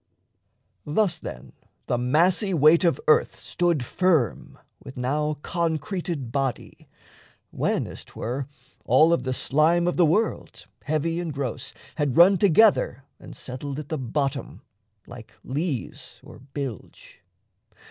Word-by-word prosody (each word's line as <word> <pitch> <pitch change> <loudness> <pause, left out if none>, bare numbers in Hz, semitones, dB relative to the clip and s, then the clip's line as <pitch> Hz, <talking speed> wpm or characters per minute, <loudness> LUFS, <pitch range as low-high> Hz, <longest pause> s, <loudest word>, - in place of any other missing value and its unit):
Thus, 180 +4 +1
then, - - -9 0.3
the 120 - -1
massy 175 - +2
weight 155 +3 +5
of 170 -2 +2
earth 155 - +3
stood 170 -7 -1
firm 160 - 0 0.3
With 130 - -11
now 150 +4 -1
concreted 170 - -3
body, 135 -2 -4 0.6
when - - -1
(as - - -10
'twere) 130 +4 -5 0.4
All 160 +2 +5
of 170 - +1
the 130 0 -3
slime 160 +6 +2
of 175 - -1
the 175 - +5
world, 210 +8 -1 0.2
heavy 160 +2 -1
and 170 -2 -3
gross, 140 -4 -5 0.2
Had 145 -4 -1
run 180 +2 +7
together 195 - +4 0.2
and - - -11
settled 135 +2 -6
at 150 -2 -7
the 155 - -3
bottom, 135 +2 -3 0.4
Like 120 -2 -12
lees 140 -1 -4
or - - -13
bilge. 135 - -8
150 Hz, 125 wpm, -24 LUFS, 135-170 Hz, 0.6 s, run